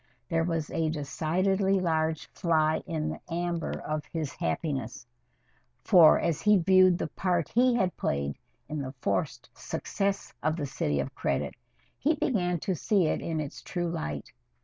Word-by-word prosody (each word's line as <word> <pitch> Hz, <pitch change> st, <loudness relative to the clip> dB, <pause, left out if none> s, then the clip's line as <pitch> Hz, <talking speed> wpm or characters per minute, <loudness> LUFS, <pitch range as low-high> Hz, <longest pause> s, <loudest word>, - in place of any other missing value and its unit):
There 165 Hz, -2 st, +2 dB
was 165 Hz, -2 st, -2 dB
a 160 Hz, -1 st, 0 dB
decidedly 185 Hz, +6 st, +1 dB
large 160 Hz, -3 st, 0 dB
fly 160 Hz, -3 st, +2 dB
in 160 Hz, -3 st, -2 dB
the -, -, -5 dB
amber 170 Hz, -1 st, -1 dB
of 155 Hz, 0 st, -3 dB
his 155 Hz, -4 st, -4 dB
happiness, 120 Hz, -, -3 dB, 0.8 s
for 170 Hz, -4 st, +7 dB
as 165 Hz, -4 st, 0 dB
he 210 Hz, -1 st, +5 dB
viewed 185 Hz, 0 st, +5 dB
the -, -, -2 dB
part 175 Hz, -1 st, 0 dB
he 245 Hz, +1 st, +3 dB
had 185 Hz, -7 st, +1 dB
played 70 Hz, 0 st, -1 dB, 0.3 s
in 150 Hz, -1 st, -3 dB
the 130 Hz, -1 st, -5 dB
forced 100 Hz, -7 st, -2 dB
success 195 Hz, 0 st, -3 dB
of 155 Hz, +1 st, +1 dB
"The 155 Hz, -4 st, -3 dB
City 75 Hz, -, -1 dB
of 70 Hz, -, -6 dB
Credit" -, -, -1 dB, 0.5 s
he 305 Hz, +4 st, +2 dB
began 180 Hz, -, 0 dB
to 190 Hz, -, -1 dB
see 185 Hz, +2 st, +2 dB
it -, -, 0 dB
in 160 Hz, -1 st, -2 dB
its 150 Hz, -2 st, -5 dB
true 175 Hz, -2 st, -3 dB
light. 75 Hz, -, -4 dB
165 Hz, 160 wpm, -28 LUFS, 150-185 Hz, 0.8 s, for